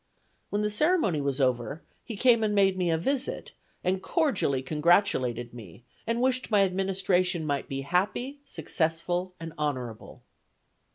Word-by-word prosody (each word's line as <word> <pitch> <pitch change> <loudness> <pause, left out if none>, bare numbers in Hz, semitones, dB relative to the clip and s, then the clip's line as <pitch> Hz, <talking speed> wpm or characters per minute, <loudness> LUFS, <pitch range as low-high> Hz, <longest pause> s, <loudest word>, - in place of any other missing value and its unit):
When 205 +1 -1
the 210 - 0
ceremony 260 - +2
was 140 0 -1
over, 130 +3 0 0.2
he 230 - -6
came 235 -1 +4
and 210 -1 +1
made 195 -2 +4
me 180 -2 0
a 165 - +2
visit, 270 - -2 0.3
and 185 +1 0
cordially 255 - 0
congratulated 130 - +1
me, 115 -2 -12 0.2
and 230 +1 0
wished 255 0 +1
my 205 -3 +5
administration 185 -2 0
might 145 -2 -2
be 135 0 -3
happy, 200 - -1
successful 175 - -2
and 165 -1 -7
honorable." 130 -7 -4
180 Hz, 145 wpm, -28 LUFS, 140-210 Hz, 0.3 s, my